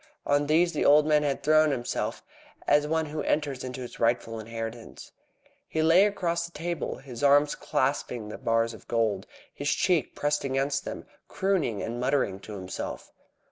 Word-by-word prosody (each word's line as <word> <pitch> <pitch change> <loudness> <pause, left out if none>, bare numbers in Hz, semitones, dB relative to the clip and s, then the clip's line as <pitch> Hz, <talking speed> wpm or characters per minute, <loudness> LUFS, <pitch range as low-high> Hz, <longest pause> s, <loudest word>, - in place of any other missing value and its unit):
On 145 0 +2
these 170 +3 +3
the - - 0
old 150 +1 +6
man 150 -1 +4
had 145 -2 -1
thrown 155 +1 +5
himself, 125 -4 -2 0.4
as 150 0 +3
one 160 +1 +1
who 150 0 -4
enters 145 -4 -1
into 130 0 -6
his 125 - -8
rightful 115 -1 0
inheritance. 115 +1 -7 0.6
He 160 - -1
lay 175 +6 +6
across 170 -4 -1
the - - -18
table, 170 +2 -3
his 125 -4 -9
arms 145 +1 +5
clasping 115 -4 -1
the - - -7
bars 115 0 +1
of 110 - -14
gold, 110 -4 0 0.3
his 145 +1 -2
cheek 175 -1 +1
pressed 145 0 0
against 135 +1 -1
them, - - -6 0.2
crooning 180 - 0
and 120 +2 -4
muttering 125 -7 0
to 105 - -10
himself. 95 -1 -6
145 Hz, 170 wpm, -27 LUFS, 115-155 Hz, 0.6 s, old